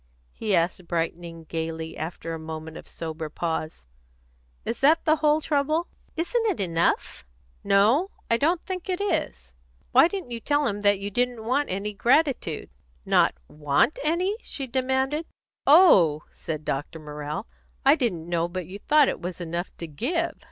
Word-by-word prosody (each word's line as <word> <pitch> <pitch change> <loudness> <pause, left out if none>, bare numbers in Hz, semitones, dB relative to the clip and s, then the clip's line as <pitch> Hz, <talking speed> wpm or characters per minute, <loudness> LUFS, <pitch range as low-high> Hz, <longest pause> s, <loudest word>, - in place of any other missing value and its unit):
He 210 -3 0
asked, 170 +1 0
brightening 165 0 -3
gaily 160 0 -4
after 165 +1 -5
a 165 - -5
moment 160 0 -7
of - - -10
sober 160 -1 -6
pause, 160 - -4 0.8
"Is 235 - -3
that 305 +4 +4
the 315 0 +4
whole 305 0 +3
trouble?" 305 +3 +1 0.3
"Isn't 350 +9 0
it 400 - 0
enough?" 170 - 0 0.4
"No; 225 - +4 0.2
I 230 - +3
don't 330 +6 +1
think 375 0 -5
it 365 - 0
is. 65 - -2 0.4
Why - - +7
didn't 375 -9 -6
you 235 - -3
tell 290 +4 +1
him 205 -4 -1
that 205 -1 +4
you 200 +1 -5
didn't 245 0 -1
want 275 +5 +1
any 200 +3 -3
gratitude?". 245 - +1 0.3
"Not - - +3
want 150 - +1
any?" 360 +7 +1
she 275 - -5
demanded. 265 +4 0 0.4
"Oh!" 195 - +6
said 155 -2 -6
Dr. 145 +4 -3
Morrell, 150 -1 -6 0.4
"I - - +8
didn't 175 -9 -1
know 170 -1 0
but 180 0 -5
you 195 +4 -9
thought 295 +4 +4
it - - -2
was 180 0 -5
enough 175 +1 -3
to 170 - -6
_give." 330 - -1
200 Hz, 160 wpm, -25 LUFS, -, 0.8 s, I